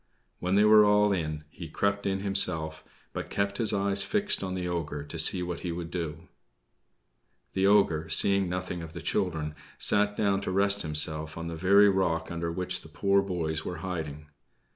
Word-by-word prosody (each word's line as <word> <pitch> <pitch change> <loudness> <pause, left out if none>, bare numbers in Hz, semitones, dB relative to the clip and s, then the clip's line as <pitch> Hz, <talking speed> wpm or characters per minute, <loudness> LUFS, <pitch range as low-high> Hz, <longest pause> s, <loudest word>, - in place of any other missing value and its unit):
When 90 +2 -1
they 105 - +4
were 105 0 +7
all 105 0 +3
in 75 -4 -4
he 85 - -9
crept 100 +5 -1
in 95 0 -2
himself, 80 -5 0 0.3
but - - -6
kept 100 0 -2
his 115 - +3
eyes 100 0 +1
fixed 210 - +1
on 95 -1 -4
the 90 -1 -4
ogre, 75 -4 -4
to 75 +2 -7
see 90 +3 +4
what 90 -1 -5
he 90 - -5
would 85 0 -6
do. 85 -4 -6 1.3
The 95 0 +1
ogre, 95 -6 +2
seeing 100 -2 +2
nothing 90 -1 -4
of 80 -1 -9
the - - -8
children, 80 -5 -2 0.2
sat 105 0 +5
down 100 -2 0
to - - -4
rest 100 +1 +1
himself 80 0 0
on 85 0 -5
the 85 - -6
very 100 +5 +4
rock 85 -5 0
under 85 0 -3
which 90 +1 -2
the - - -14
poor 100 0 +1
boys 85 -5 -3
were 90 - -6
hiding. 75 -5 -6
90 Hz, 185 wpm, -27 LUFS, 80-100 Hz, 1.3 s, were